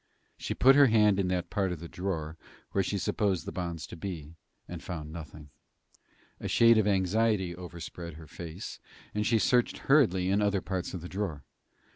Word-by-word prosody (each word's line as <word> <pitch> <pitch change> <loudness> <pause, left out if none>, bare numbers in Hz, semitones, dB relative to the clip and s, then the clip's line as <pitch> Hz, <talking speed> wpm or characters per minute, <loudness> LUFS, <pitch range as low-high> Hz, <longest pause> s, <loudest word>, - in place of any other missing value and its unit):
She - - -4
put 135 +1 +6
her 140 -1 +7
hand 105 -3 +4
in 95 - +1
that 90 -1 -2
part 95 -3 0
of 90 - -4
the 85 - -7
drawer 80 -4 -4 0.4
where 100 - +1
she 100 - -2
supposed 95 -3 0
the - - -4
bonds 85 -4 -4
to - - -9
be, 80 -4 -6 0.3
and - - -7
found 80 -3 -6
nothing. 75 -3 -9 0.9
A - - -4
shade 115 -1 +6
of 105 - +2
anxiety 100 -1 +1
overspread 85 -1 -8
her 80 0 -11
face, 85 +4 -8 0.3
and 105 0 0
she 115 - +4
searched 120 +2 +2
hurriedly 95 - +3
in 100 +2 +2
other 100 -1 +2
parts 95 -1 -4
of 90 - -5
the 90 - -7
drawer. 90 -7 -4
95 Hz, 185 wpm, -29 LUFS, 85-105 Hz, 0.9 s, her